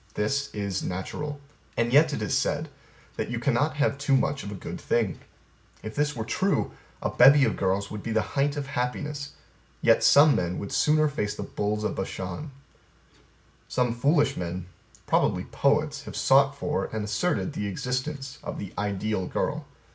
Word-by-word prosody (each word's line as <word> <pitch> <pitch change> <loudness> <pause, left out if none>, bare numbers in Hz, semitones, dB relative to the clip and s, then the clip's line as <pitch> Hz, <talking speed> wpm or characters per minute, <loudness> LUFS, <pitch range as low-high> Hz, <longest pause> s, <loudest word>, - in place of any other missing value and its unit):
This 140 +7 0
is 100 -2 -2
natural. 145 +11 -4 0.4
And 115 +1 +1
yet 155 +2 +6
is 105 -7 -1
said - - 0 0.5
that - - -2
you 120 - -2
cannot 140 +5 +1
have 145 -1 +1
too 145 -2 +3
much 140 +1 0
of 100 - -6
a - - -5
good 95 - -7
thing. 110 -7 0 0.6
If 110 - -6
this 150 0 0
were 110 -2 -3
true, 190 - 0 0.3
a - - 0
bevy 140 0 +7
of 110 - 0
girls 95 +1 0
would 105 -1 -5
be 115 - -5
the 110 -1 +2
height 140 +1 +1
of 145 - -2
happiness. 145 +2 -3 0.5
Yet - - +4
some 145 +1 +7
men 90 0 -1
would 100 - -5
sooner 155 0 +3
face 120 -8 -2
the - - -5
bulls 105 +1 -2
of - - 0
Bashan. 95 - -5 1.2
Some 125 -2 +1
foolish 140 +3 +2
men 90 0 -4 0.4
probably 90 - +2
poets 145 +3 0
have - - -8
sought 140 +1 +4
for 150 +2 -1
and 110 -1 -4
asserted 155 - 0
the 105 -7 -3
existence 130 +6 -3
of - - -5
the 100 - -7
ideal 100 -1 -1
girl. - - -2
125 Hz, 170 wpm, -27 LUFS, 105-145 Hz, 1.2 s, bevy